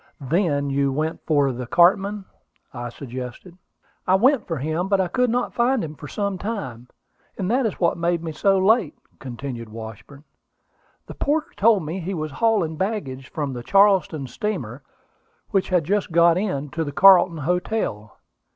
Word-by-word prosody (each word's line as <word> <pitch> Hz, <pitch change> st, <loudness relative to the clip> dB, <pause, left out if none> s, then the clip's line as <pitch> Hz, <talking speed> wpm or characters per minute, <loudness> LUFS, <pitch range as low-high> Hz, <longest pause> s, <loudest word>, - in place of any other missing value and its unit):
"Then 145 Hz, -1 st, 0 dB
you 140 Hz, 0 st, +1 dB
went 155 Hz, +4 st, -2 dB
for 145 Hz, -4 st, +3 dB
the 125 Hz, 0 st, -6 dB
cartman," 195 Hz, -, +3 dB, 0.5 s
I 120 Hz, -1 st, -5 dB
suggested. 130 Hz, +7 st, -8 dB, 0.5 s
"I 185 Hz, -, +5 dB
went 255 Hz, +5 st, +3 dB
for 165 Hz, -, -2 dB
him; 160 Hz, +6 st, -2 dB
but 195 Hz, -1 st, +2 dB
I 185 Hz, -, +1 dB
could 250 Hz, +8 st, +1 dB
not 245 Hz, +2 st, -1 dB
find 245 Hz, +1 st, +1 dB
him 155 Hz, -2 st, -6 dB
for 150 Hz, -, -10 dB
some 200 Hz, +2 st, -3 dB
time, 150 Hz, -, -5 dB, 0.5 s
and 190 Hz, +1 st, -2 dB
that 250 Hz, -1 st, +2 dB
is 205 Hz, -, -6 dB
what 170 Hz, -1 st, +1 dB
made 170 Hz, 0 st, 0 dB
me 165 Hz, -, -4 dB
so 195 Hz, +5 st, +2 dB
late," 190 Hz, -3 st, +2 dB, 0.2 s
continued 120 Hz, -2 st, -7 dB
Washburn. 110 Hz, +6 st, -10 dB, 0.8 s
"The -, -, -9 dB
porter 300 Hz, +2 st, -1 dB
told 210 Hz, -5 st, +3 dB
me 165 Hz, +5 st, -4 dB
he 185 Hz, +2 st, -4 dB
was 155 Hz, -2 st, -4 dB
hauling 185 Hz, -3 st, +1 dB
baggage 150 Hz, -10 st, -3 dB
from 145 Hz, -4 st, -3 dB
the 120 Hz, -, -6 dB
Charleston 195 Hz, -3 st, +3 dB
steamer, 210 Hz, -, -4 dB, 0.7 s
which 195 Hz, -3 st, +1 dB
had 180 Hz, -3 st, +2 dB
just 195 Hz, +3 st, -1 dB
got 170 Hz, 0 st, +5 dB
in, 175 Hz, -7 st, -2 dB
to 165 Hz, +4 st, -3 dB
the 145 Hz, -, -5 dB
Carlton 180 Hz, +1 st, +6 dB
Hotel. 155 Hz, -, -2 dB
170 Hz, 170 wpm, -23 LUFS, 140-200 Hz, 0.8 s, Carlton